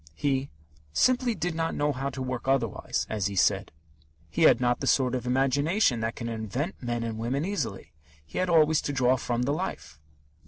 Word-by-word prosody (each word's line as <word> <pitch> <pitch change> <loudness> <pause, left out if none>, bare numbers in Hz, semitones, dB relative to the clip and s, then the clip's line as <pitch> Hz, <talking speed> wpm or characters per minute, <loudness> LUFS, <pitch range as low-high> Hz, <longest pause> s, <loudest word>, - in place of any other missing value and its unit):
He 135 - 0 0.4
"simply 250 - +2
did 180 -2 -2
not 165 0 -2
know 145 0 +1
how 135 +1 -3
to 130 -1 -5
work 125 0 -4
otherwise," 135 -5 0
as 105 -3 -1
he 100 - -5
said. - - +2 0.6
He - - -2
had - - +3
not 120 -1 +1
the 135 - -3
sort 130 -2 +3
of 125 -1 -3
imagination 135 - +2
that 115 +1 -2
can 115 - -5
invent 115 - -4
men 120 -2 -2
and 110 -1 -4
women 130 +7 -1
easily. 190 - -4 0.3
He - - -5
had 185 0 0
always 160 -2 +4
to 145 - -3
draw 130 -1 +3
from 120 -1 -2
the 135 - 0
life. 75 - -5
130 Hz, 195 wpm, -27 LUFS, 120-150 Hz, 0.6 s, always